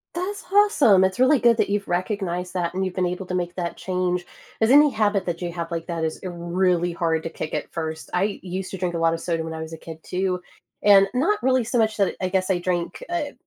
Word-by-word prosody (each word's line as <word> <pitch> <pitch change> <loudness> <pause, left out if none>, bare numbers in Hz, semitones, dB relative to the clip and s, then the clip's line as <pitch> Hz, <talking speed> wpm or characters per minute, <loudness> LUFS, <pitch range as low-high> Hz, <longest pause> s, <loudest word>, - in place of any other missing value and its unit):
That's 400 +4 -4
awesome. 295 - +5
It's 190 +2 0
really 260 +2 +5
good 235 -1 +4
that - - +1
you've 205 0 -1
recognized 180 -1 -2
that 175 -2 -1
and 190 +1 -1
you've 185 - -3
been 185 -1 0
able 180 +2 -3
to 180 - -4
make 175 -1 -2
that 175 -2 -3
change, 180 -1 -2 0.4
as 220 - +4
any 295 +1 +7
habit 210 -5 +1
that 170 -1 -3
you 175 -1 -3
have 170 -1 -5
like 165 +1 -4
that 165 -2 -2
is, 160 - -4
uh, - - -2
really 175 0 0
hard 165 -2 0
to - - -3
kick 155 -1 -6
at 150 - -3
first. 160 -1 -5
I 195 +3 0
used 185 +1 -5
to 190 - -5
drink 175 -1 -2
a - - 0
lot 165 0 +2
of 165 - -3
soda 165 -1 -2
when 160 0 -5
I 160 - -5
was 160 0 -7
a 160 - -6
kid 160 0 -9
too, 185 0 -1 0.4
and 195 -1 +7
not 330 +11 +1
really 255 -3 +2
so 240 - -1
much 220 -1 +1
that 200 -3 +1
I 185 - 0
guess 185 0 0
I 180 -2 +2
drank, 175 -1 -2
uh, 320 -5 -2
185 Hz, 260 wpm, -23 LUFS, 170-205 Hz, 0.4 s, any